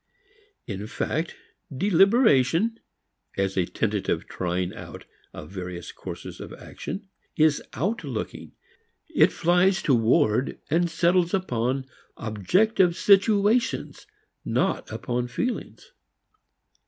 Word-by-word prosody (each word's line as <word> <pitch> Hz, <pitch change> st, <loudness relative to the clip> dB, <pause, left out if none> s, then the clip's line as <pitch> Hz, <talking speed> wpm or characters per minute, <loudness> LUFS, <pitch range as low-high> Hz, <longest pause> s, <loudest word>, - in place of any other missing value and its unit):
In 105 Hz, 0 st, -5 dB
fact, 160 Hz, +7 st, -2 dB, 0.4 s
deliberation, 195 Hz, -, +3 dB, 0.6 s
as 95 Hz, -1 st, 0 dB
a 90 Hz, -2 st, +1 dB
tentative -, -, -1 dB
trying 90 Hz, 0 st, -2 dB
out -, -, -10 dB, 0.3 s
of 75 Hz, -, -10 dB
various 90 Hz, -2 st, -6 dB
courses -, -, -8 dB
of -, -, -8 dB
action, 200 Hz, +1 st, -7 dB, 0.3 s
is 155 Hz, -2 st, +4 dB
outlooking. 150 Hz, -, -3 dB, 0.6 s
It -, -, +5 dB
flies 180 Hz, +3 st, +2 dB
toward 125 Hz, 0 st, +2 dB
and 170 Hz, +2 st, +2 dB
settles 175 Hz, +2 st, +2 dB
upon 130 Hz, -7 st, -1 dB, 0.3 s
objective 175 Hz, -, +2 dB
situations 205 Hz, +4 st, +2 dB, 0.4 s
not -, -, 0 dB
upon 125 Hz, 0 st, -2 dB
feelings. 240 Hz, -, -4 dB
160 Hz, 90 wpm, -25 LUFS, -, 0.6 s, It